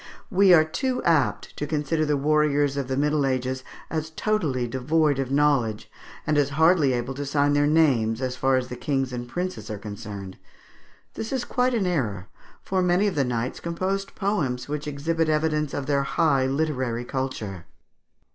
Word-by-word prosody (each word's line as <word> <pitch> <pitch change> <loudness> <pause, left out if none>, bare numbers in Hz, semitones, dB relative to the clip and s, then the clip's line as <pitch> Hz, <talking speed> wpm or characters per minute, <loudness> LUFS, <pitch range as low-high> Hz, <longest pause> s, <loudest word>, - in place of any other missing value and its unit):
We 195 0 +5
are 160 -3 +7
too 250 - -2
apt 145 -11 +1
to 150 - -3
consider 155 +1 0
the 150 -1 +2
warriors 145 -1 +2
of 140 -2 -2
the 130 0 -2
Middle 150 +1 +2
Ages 130 -1 -1 0.3
as 155 -1 -2
totally 160 - -1
devoid 140 +4 +1
of 135 -2 -1
knowledge, 135 -6 +1 0.3
and 150 -1 +2
as 140 -1 +2
hardly 160 -3 +5
able 120 +2 -2
to 140 +2 -4
sign 145 0 +1
their 145 0 +3
names, 130 -8 +3
as 130 -1 -2
far 135 +1 +2
as 130 - -2
the 125 - -5
kings 135 -1 -1
and 120 0 -5
princes 180 +1 -4
are 105 - -4
concerned. 100 -2 -8 0.7
This 220 - -5
is 260 -2 -1
quite 250 -1 +1
an 210 -5 +1
error; 110 - -2 0.3
for 190 -1 0
many 180 +2 +3
of 200 - +1
the 140 - +1
knights 125 0 -2
composed 190 +3 -3
poems 145 - -1
which 150 0 -4
exhibit 160 +3 -1
evidence 150 -1 +1
of 140 - -3
their 140 -1 +1
high 140 -1 +2
literary 130 -5 -1
culture. 115 -9 -4
145 Hz, 175 wpm, -25 LUFS, 130-160 Hz, 0.7 s, are